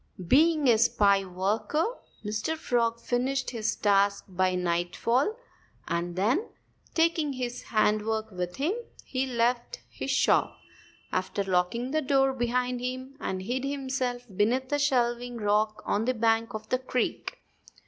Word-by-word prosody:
Being 305 - +4
a 230 -3 +5
spry 200 -3 +4
worker, 205 - 0 0.4
Mr. 220 +10 -2
Frog 235 -5 0
finished 255 +2 -1
his 225 -2 -1
task 200 -1 +2
by 185 -1 +1
nightfall. 180 - 0 0.5
And 170 0 -2
then, 235 - +1 0.5
taking 325 -3 +2
his 245 -1 -4
handiwork 215 0 0
with 180 -1 -4
him, 300 +8 0 0.3
he 265 0 -1
left 240 - 0
his - - -5
shop - - +2 0.5
after 190 +2 -1
locking 195 +7 0
the 310 +1 +1
door 270 -1 +3
behind 250 0 -1
him 255 +2 -5
and 185 -7 -3
hid 250 +6 -2
himself 260 -3 -2
beneath 250 +7 +1
a 290 - +2
shelving 245 -3 +1
rock 215 0 +1
on 210 +2 0
the 255 +1 +1
bank 225 0 +1
of 215 0 -7
the 255 - +1
creek. 255 -1 -2
240 Hz, 140 wpm, -28 LUFS, 210-260 Hz, 0.5 s, a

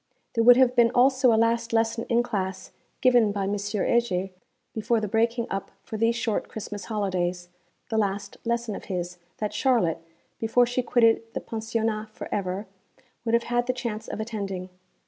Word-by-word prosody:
There 230 - +2
would 245 +1 +8
have 255 -1 +4
been 235 -1 +5
also 260 0 +5
a 220 - +4
last 230 +1 +1
lesson 225 0 +1
in 240 0 +3
class 190 -5 -4 0.3
given 245 -5 +5
by 200 -1 -2
M. 200 +2 0
Heger 205 -1 0 0.4
before 230 +1 +1
the 215 - -2
breaking 230 +3 +1
up 195 0 -3
for - - -7
these 230 +2 +2
short 230 -3 -1
Christmas 205 -1 -6
holidays 180 -4 -2 0.4
the 220 -2 +1
last 200 -1 -2
lesson 235 -1 -1
of - - -7
his, 180 -2 -4 0.2
that 210 -1 -3
Charlotte, 210 - +2 0.4
before 230 +2 +3
she 245 +1 -1
quitted 235 -2 +3
the - - 0
Pensionnat 220 -1 -2
for - - -7
ever, 195 +1 -2 0.6
would 230 0 +3
have 235 - +2
had 240 0 0
the 255 - +1
chance 230 -3 -4
of - - -5
attending. 200 -5 -4
225 Hz, 175 wpm, -26 LUFS, 200-235 Hz, 0.6 s, would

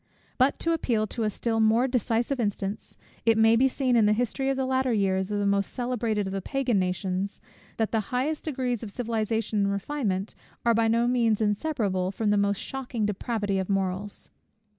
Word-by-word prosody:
But 260 +2 +3
to 335 - +1
appeal 235 -9 0
to 230 - -5
a - - +2
still 225 +2 -1
more 225 +3 +4
decisive 245 +1 0
instance: 205 -2 -3 0.3
it 225 0 +4
may 225 +1 +6
be 260 +3 +4
seen 260 -1 0
in 220 -3 +5
the 210 - +4
history 245 +4 -1
of 270 - 0
the 265 - 0
latter 260 0 +1
years 190 -3 +1
of 205 - -1
the 205 - 0
most 200 0 +1
celebrated 235 -4 -1
of 190 - -4
the 195 - -2
Pagan 260 -3 0
nations, 185 +1 -2 0.4
that 220 -1 0
the 225 - +2
highest 275 +5 -1
degrees 255 -6 -1
of 225 - -6
civilization 225 -2 -1
and 200 0 +2
refinement 200 -3 -2 0.3
are 235 - +5
by 225 0 +2
no 230 +1 +2
means 235 -4 +2
inseparable 205 -4 0
from 205 +2 0
the - - +3
most 200 0 +2
shocking 245 -2 -3
depravity 205 -1 -1
of 190 - -3
morals. 195 +1 -2
225 Hz, 195 wpm, -27 LUFS, 200-245 Hz, 0.4 s, may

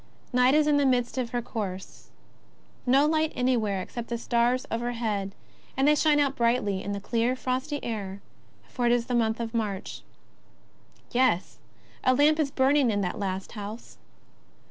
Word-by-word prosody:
Is^ight 250 +1 +4
is 305 0 +4
in 295 -1 +3
the 285 - +3
midst 250 0 +1
of 245 -2 -2
her 240 0 -2
course. 195 -5 -6 0.8
'No 270 +3 +5
light 315 0 +1
an\^where, 225 -7 0
except 235 +3 -7
the 235 - -3
stars 240 +2 +1
overhead, 225 -4 -2 0.4
and 270 +1 +3
they 300 - +6
shine 300 0 +3
out 280 -1 +1
brightly 230 -5 +1
in 205 - -4
the 200 - -3
clear, 235 +4 0
frosty 260 +3 -2
air, 200 -4 -4 0.5
for 245 -2 -1
it - - +4
is 240 -1 +2
the 250 - -4
month 225 -1 +1
of 230 -1 -4
March. 210 -4 -3 1.1
Yes! 245 -8 +1 0.4
a 255 - +4
lamp 300 +3 +4
is 300 -3 +1
burning 270 -1 +3
in 205 -2 0
that 185 +3 -3
last 190 -1 -3
house. 210 +1 -8
240 Hz, 165 wpm, -27 LUFS, 215-260 Hz, 1.1 s, they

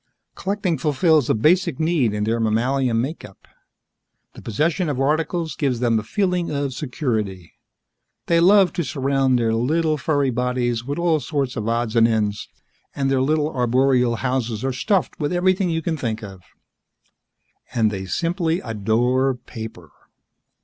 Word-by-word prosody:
Collecting 190 -5 -2
fulfills 155 -1 +2
a - - +3
basic 155 - +2
need 155 -8 +1
in 105 0 -2
their 115 +2 0
mammalian 115 +2 +1
makeup; 125 - -6 0.9
the - - -12
possession 155 - 0
of 135 -3 -2
articles 160 +4 0
gives 135 -5 -1
them 115 -2 +2
a - - -6
feeling 180 - -1
of 140 -2 -2
security. 110 - -3 0.7
They 170 -1 +3
love 190 +2 +5
to 170 - -1
surround 135 -2 +1
their 115 -2 +1
little 155 +6 +1
furry 145 -4 +1
bodies 125 -1 -1
with 140 +3 -4
all 170 -2 +2
sorts 140 -4 -2
of 110 -2 -3
odds 115 -1 -1
and 115 0 +5
ends, 105 -2 -1 0.5
and 135 -1 0
their 135 -1 +2
little 150 +2 0
arboreal 125 0 +2
houses 125 -2 -2
are 135 - 0
stuffed 190 - 0
with 145 -2 -1
everything 185 +1 +1
you 165 -1 -1
can 160 -1 -1
think 115 -4 -3
of. 95 -3 -9 1.3
And 110 -4 +1
they 95 -2 -5
simply 170 - -1
adore 120 +4 +1
paper. 110 - -10
130 Hz, 150 wpm, -22 LUFS, 115-160 Hz, 1.3 s, love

